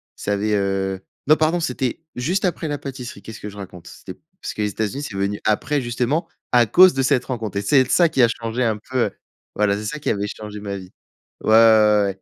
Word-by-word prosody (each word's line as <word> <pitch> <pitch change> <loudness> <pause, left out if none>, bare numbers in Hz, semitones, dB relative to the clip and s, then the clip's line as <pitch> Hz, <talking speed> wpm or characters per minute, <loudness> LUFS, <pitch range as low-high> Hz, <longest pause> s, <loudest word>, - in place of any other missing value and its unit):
ça 105 - -2
avait, 105 +1 0
heu 95 -1 -1 0.3
non 155 - +7
pardon, 160 +3 +1
c'était 160 -3 -2
juste 180 +11 -1
après 165 -2 -1
la 145 -1 -2
pâtisserie. 125 -7 -8
Qu'est-ce 110 -1 -10
que 105 - -7
je 100 - -12
raconte? 90 -3 -10
C'était 95 - -11 0.2
parce - - -5
que 105 - -5
les 105 - 0
Etats-Unis, 110 +8 -3
c'est 100 - -6
venu 100 +1 -1
après, 135 +7 +1
justement, 125 +7 -1 0.2
à 120 -2 +5
cause 180 - +7
de 135 - 0
cette 130 -2 +2
rencontre. 110 -6 -4
Et - - 0
c'est 135 +7 +4
l 130 - 0
ça 170 -2 +4
qui 135 -5 +1
a 120 - +7
changé 115 +2 -3
un 110 -2 +1
peu 130 -2 +1 0.4
voilà, 100 -1 +2
c'est 105 - -6
ça 150 +8 -4
qui - - -2
avait 100 0 -1
changé 105 0 -8
ma 100 -1 -5
vie. 95 -1 -11 0.5
Ouais, - - -1
ouais, - - +5
ouais, 110 -2 +6
ouais, 95 -1 -6
110 Hz, 240 wpm, -21 LUFS, 100-135 Hz, 0.5 s, non